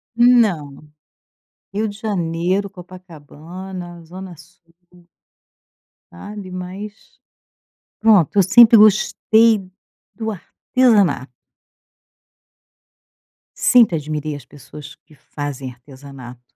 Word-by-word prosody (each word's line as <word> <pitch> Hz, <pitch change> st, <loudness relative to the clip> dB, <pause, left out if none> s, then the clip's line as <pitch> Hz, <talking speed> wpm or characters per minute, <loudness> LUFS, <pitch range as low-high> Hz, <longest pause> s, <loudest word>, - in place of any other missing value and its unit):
Não, 195 Hz, -, +2 dB, 0.8 s
Rio 215 Hz, +2 st, -2 dB
de 205 Hz, +1 st, -10 dB
Janeiro, 185 Hz, -1 st, -2 dB
Copacabana, 175 Hz, 0 st, -11 dB
zona 185 Hz, +1 st, -10 dB
sul. 165 Hz, +1 st, -22 dB, 1.4 s
sabe, 185 Hz, -, -10 dB
mas, 185 Hz, +3 st, -7 dB, 1.1 s
pronto, 210 Hz, -8 st, +4 dB
eu 195 Hz, -, +6 dB
sempre 230 Hz, +3 st, +7 dB
gostei 215 Hz, +1 st, +4 dB, 0.6 s
do 220 Hz, -1 st, -5 dB
artesanato. 205 Hz, -, 0 dB, 2.2 s
Sempre 235 Hz, -9 st, +4 dB
admirei 150 Hz, 0 st, -5 dB
as 145 Hz, -, -11 dB
pessoas 145 Hz, +1 st, -13 dB
que 155 Hz, -, -25 dB
fazem 140 Hz, -3 st, -7 dB
artesanato. 130 Hz, -1 st, -13 dB
180 Hz, 80 wpm, -19 LUFS, 150-210 Hz, 2.2 s, sempre